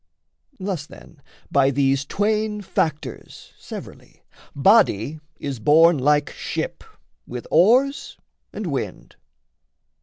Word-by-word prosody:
Thus 185 -6 -4
then 145 - -16 0.3
by 135 -1 +4
these 135 0 +1
twain 210 +4 -1
factors, 155 -5 -4
severally, - - -11 0.3
Body 155 - +3 0.2
is 140 -4 -5
borne 160 +6 +5
like 145 +2 +2
ship - - -5 0.4
with 125 -1 -7
oars 250 - +3 0.3
and - - -6
wind. - - -5
155 Hz, 95 wpm, -22 LUFS, 140-205 Hz, 0.4 s, borne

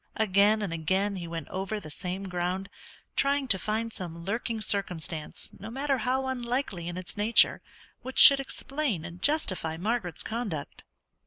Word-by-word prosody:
Again 210 +1 +3
and 185 -5 -3
again 190 +5 0
he 170 -2 -6
went 165 0 -6
over 195 +3 -3
the 155 -6 -10
same 185 +4 -5
ground, 180 +1 -3 0.5
trying 280 0 +1
to 190 - +4
find 220 +3 -2
some 170 -2 -6
lurking 225 +2 -2
circumstance, 180 -6 -1
no 200 - -7
matter 270 +2 -1
how 255 +3 0
unlikely 245 -8 -3
in 175 +1 -5
its 185 +2 -7
nature, 215 +3 +4 0.4
which 260 +1 -8
should 275 -1 +10
explain 275 - -3
and 175 +1 -10
justify 185 - +1
Margaret's 195 -3 +1
conduct. 215 -11 -5
200 Hz, 155 wpm, -28 LUFS, 175-240 Hz, 0.5 s, should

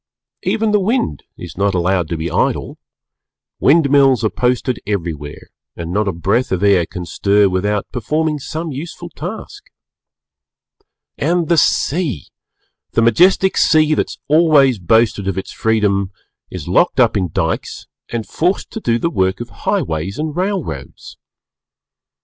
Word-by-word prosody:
Even 220 -1 0
the 210 - +3
Wind 195 - -1 0.2
is - - -9
not 100 0 0
allowed 90 -1 +1
to 85 - -3
be 80 +2 -4
idle; - - -1 0.8
wind 150 +1 +4
mills 135 -5 +4
are 110 - +1
posted 125 0 0
everywhere 80 -8 -5 0.2
and 85 +1 -6
not 105 +1 0
a - - +1
breath 100 +9 0
of 95 +1 -1
air 95 -4 +3
can 90 -3 -7
stir 100 +4 +2
without 100 +2 -1
performing 150 +5 -1
some 160 +4 -5
useful 145 +5 -7
task. - - -8 1.5
And 170 +2 0
the 170 - +4
Sea! 145 - +1 0.7
The 115 - +2
majestic 185 - +4
Sea, 155 -1 +4
that - - 0
has - - -9
always 145 -6 +4
boasted 110 +1 +2
of 95 - -2
its 95 - -5
freedom, 105 -3 0 0.4
is - - -7
locked - - +2
up - - +4
in 95 -4 0
Dykes - - -3 0.2
and 115 -2 -3
forced 180 +4 -1
to 225 - -5
do 115 - 0
the 170 +7 -1
work 95 - 0
of 120 - -6
highways 80 +5 -2
and 155 0 -3
railroads. 185 -1 -4
115 Hz, 150 wpm, -17 LUFS, 95-155 Hz, 1.5 s, wind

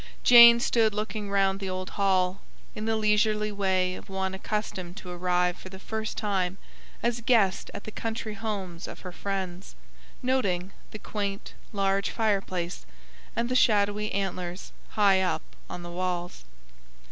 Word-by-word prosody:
Jane 235 -1 +10
stood 225 -3 +2
looking 210 -1 -3
round 195 -1 +2
the 195 -1 -4
old 185 0 -4
hall, 190 -1 +1 0.3
in 215 - -5
the 225 0 +1
leisurely 215 0 +2
way 190 -2 +1
of - - -10
one 190 0 -2
accustomed 190 -2 -4
to 180 -3 -8
arrive 180 0 +1
for 185 - -10
the 190 - -9
first 220 +2 -4
time 190 -3 -1 0.5
as 235 0 0
guest 220 -5 +2
at 205 - -6
the 215 - -7
country 220 -1 -4
homes 195 -5 -5
of - - -9
her 180 - -7
friends; 190 - -5 0.5
noting 195 -8 0 0.2
the - - -7
quaint, 205 -1 -4 0.2
large 195 -1 +1
fireplace, 195 -5 -1 0.5
and 235 +1 0
the 255 - -1
shadowy 210 -3 +3
antlers 185 -2 -3 0.2
high 195 -3 +4
up 185 - 0 0.3
on 175 - -6
the 175 - -7
walls. 175 - -3
195 Hz, 150 wpm, -27 LUFS, 185-215 Hz, 0.5 s, Jane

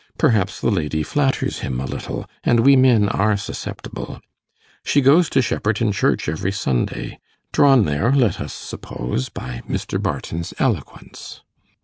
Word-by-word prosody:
Perhaps 115 - +1
the - - +2
lady 80 -5 -1
flatters 135 - 0
him 65 -1 -3
a 65 - -3
little, - - -5 0.2
and 120 -1 +3
we 135 +3 +6
men 125 -6 +5
are 105 +1 +1
susceptible. 100 - -7 0.6
She 145 - +2
goes 145 +5 +5
to 135 - +2
Shepperton 105 -1 0
Church 100 - 0
every 80 +5 -1
Sunday 65 -12 -2 0.3
drawn 135 -6 +5
there, 75 - +1
let 130 -6 +2
us - - -5
suppose, 65 +1 -5
by - - -7
Mr. - - -2
Barton's 85 +3 -4
eloquence. 110 - -4
105 Hz, 140 wpm, -21 LUFS, 80-130 Hz, 0.6 s, we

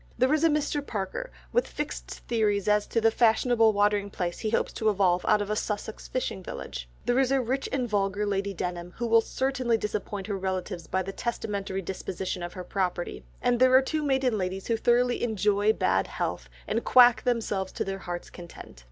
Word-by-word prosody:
There 255 +4 +3
is 310 +1 +2
a 330 - +6
Mr. 295 -1 0
Parker 195 -8 -4 0.2
with - - +2
fixed - - -5 0.2
theories 210 -4 +1
as 210 0 +3
to 230 - +1
the 225 0 +4
fashionable 225 0 +4
watering 205 -1 +2
place 175 -3 -3
he 220 - -1
hopes 225 - 0
to 220 - +1
evolve 185 -3 +2
out 210 -1 +4
of 205 - -5
a - - +1
Sussex 210 0 -4
fishing 250 -6 -3
village; - - -7 0.2
there 245 +2 +2
is 265 -1 +2
a 275 - +3
rich 260 +2 -1
and 255 -3 0
vulgar 205 -1 0
Lady 200 0 -1
Denham, 175 -1 -5
who 240 - -2
will 230 0 +5
certainly 255 -1 0
disappoint 210 -2 -4
her 205 - -2
relatives 185 -2 -3
by 190 0 0
the 195 +1 -6
testamentary 200 -5 -3
disposition 185 0 -4
of 175 0 -5
her 185 - -6
property, 180 - -2 0.2
and 245 -1 +2
there 255 0 +6
are 260 - +8
two 310 +3 -1
maiden 265 -6 +1
ladies 190 +1 -3
who 230 - +1
thoroughly 240 +2 +2
'enjoy' 210 -2 +2
bad - - +1
health, - - -4 0.2
and 230 +2 -1
quack 245 -2 +6
themselves 215 -6 -1
to - - -2
their 195 0 -4
heart's 175 -2 -6
content. 170 - -11
210 Hz, 200 wpm, -27 LUFS, 190-240 Hz, 0.2 s, are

